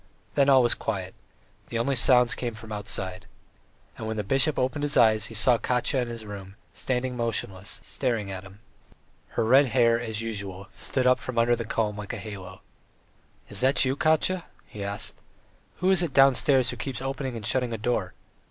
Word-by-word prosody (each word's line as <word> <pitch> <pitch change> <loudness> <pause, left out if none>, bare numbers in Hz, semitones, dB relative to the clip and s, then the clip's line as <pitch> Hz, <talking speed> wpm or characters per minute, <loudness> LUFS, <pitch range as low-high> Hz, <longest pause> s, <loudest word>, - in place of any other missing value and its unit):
Then 140 -1 +3
all 130 -2 +6
was 120 - +3
quiet, 95 -4 -4 0.6
the 120 - -3
only 135 +4 0
sounds 125 0 +5
came 120 -3 -4
from 110 0 -11
outside. 100 -1 -4 0.7
And 110 - -5
when 110 0 -3
the 105 - -1
bishop 135 +8 +2
opened 130 +3 -1
his 145 0 +1
eyes 110 -2 +5
he 115 - -8
saw 115 +2 +4
Katya 125 +2 +1
in 120 - -3
his 115 -2 -7
room, 100 -2 -9 0.2
standing 130 0 -2
motionless, 105 -5 -2
staring 115 -7 -2
at 95 -1 -6
him. 100 +2 -15 0.8
Her - - +2
red 135 +5 +5
hair, 115 -2 +3
as 110 -3 -4
usual, 100 -3 -6
stood 130 -2 -2
up 125 0 +4
from 130 -2 -6
under 120 +1 +4
the 115 -1 -5
comb 105 -1 -1
like 105 -1 -6
a - - -4
halo. 100 -4 -9 0.9
"Is 100 - -3
that 135 +3 +4
you, 130 +1 0
Katya?" 160 +4 +1 0.2
he 105 - -8
asked. 100 +1 -4 0.6
"Who 185 +1 +1
is 190 -2 +5
it 165 -6 -2
downstairs 135 -1 +4
who 125 - -8
keeps 130 +2 -4
opening 135 -1 -3
and 110 -3 -6
shutting 125 +3 0
a 115 - -3
door?" 110 -4 -2
115 Hz, 190 wpm, -26 LUFS, 105-130 Hz, 0.9 s, all